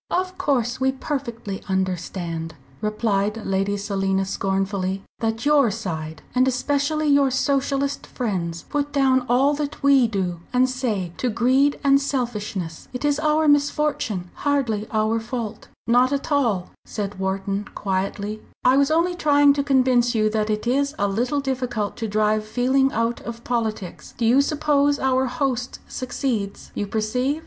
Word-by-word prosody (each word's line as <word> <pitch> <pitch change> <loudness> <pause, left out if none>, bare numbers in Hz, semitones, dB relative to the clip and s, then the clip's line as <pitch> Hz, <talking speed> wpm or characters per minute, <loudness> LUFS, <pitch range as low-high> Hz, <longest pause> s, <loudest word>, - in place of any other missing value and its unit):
"Of 370 +1 -1
course 250 -3 0
we 265 0 +2
perfectly 235 -8 -4
understand," 175 -3 -2 0.3
replied 215 0 -1
Lady 195 +1 0
Selina, 195 -1 0
scornfully, 195 0 -1 0.2
"that 225 +2 -2
your 290 -5 +5
side 160 -7 -5
and 255 +1 +3
especially 285 +4 0
your 280 -1 +4
Socialist 275 +1 0
friends, 175 -9 -3
put 290 0 -2
down 265 -2 +3
all 265 +4 +4
that 295 0 -4
we 275 -3 +5
do 185 -5 -2
and 255 +1 +3
say 230 -9 -2
to 250 - 0
greed 260 +5 +2
and 275 0 +5
selfishness. 210 - -3
It 250 +3 -3
is 290 0 +2
our 310 0 +2
misfortune 290 - +1
hardly 245 -8 0
our 220 +1 +1
fault." 225 -1 -5 0.2
"Not 245 +3 +4
at 280 +2 -2
all," 230 -11 +1
said 200 -2 -5
Wharton, 195 +1 -2
quietly, 200 +2 -2 0.2
"I 255 +2 +5
was 280 0 +4
only 335 +3 +2
trying 290 -4 +4
to 280 0 0
convince 255 -3 +3
you 215 -1 +2
that 215 0 0
it 215 +1 -1
is 280 +4 +1
a 205 - +1
little 245 +8 0
difficult 250 -6 -2
to 225 - -3
drive 215 +1 +1
feeling 260 +5 +2
out 230 +1 -1
of 235 0 -7
politics. 220 -6 -3
Do 230 - 0
you 250 +5 +5
suppose 290 -1 +2
our 265 -1 +1
host 250 -1 -2
succeeds? 240 -5 -3
You 205 - -3
perceive? 250 +8 -1
240 Hz, 150 wpm, -23 LUFS, 205-275 Hz, 0.3 s, your